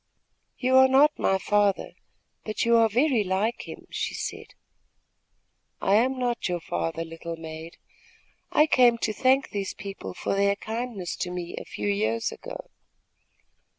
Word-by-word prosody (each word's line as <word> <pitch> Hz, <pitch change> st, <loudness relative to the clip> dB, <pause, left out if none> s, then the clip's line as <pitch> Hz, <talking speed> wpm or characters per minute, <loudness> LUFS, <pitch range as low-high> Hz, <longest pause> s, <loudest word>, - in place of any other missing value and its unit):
"You 260 Hz, 0 st, +3 dB
are 265 Hz, 0 st, +8 dB
not 280 Hz, +3 st, +4 dB
my 190 Hz, -, +2 dB
father; 205 Hz, 0 st, +1 dB, 0.5 s
but 215 Hz, +1 st, -2 dB
you 235 Hz, 0 st, +4 dB
are 225 Hz, -1 st, +5 dB
very 245 Hz, 0 st, +2 dB
like 200 Hz, +5 st, -1 dB
him," -, -, -9 dB
she -, -, -3 dB
said. -, -, -6 dB, 1.2 s
"I 195 Hz, -, +1 dB
am 255 Hz, +5 st, +3 dB
not 240 Hz, -5 st, -1 dB
your 175 Hz, -1 st, -1 dB
father, 165 Hz, -1 st, -3 dB
little 165 Hz, +1 st, -7 dB
maid. 160 Hz, +1 st, -9 dB, 0.7 s
I 300 Hz, -, +5 dB
came 245 Hz, -5 st, +5 dB
to 220 Hz, -1 st, -1 dB
thank 265 Hz, +4 st, +2 dB
these 200 Hz, -2 st, -3 dB
people 195 Hz, -, -7 dB
for -, -, -2 dB
their 200 Hz, 0 st, +2 dB
kindness 220 Hz, -4 st, -4 dB
to 180 Hz, -, -3 dB
me 180 Hz, -1 st, -5 dB
a -, -, -7 dB
few 105 Hz, -, -5 dB
years 110 Hz, +3 st, 0 dB
ago." -, -, -9 dB
205 Hz, 150 wpm, -26 LUFS, 175-245 Hz, 1.2 s, are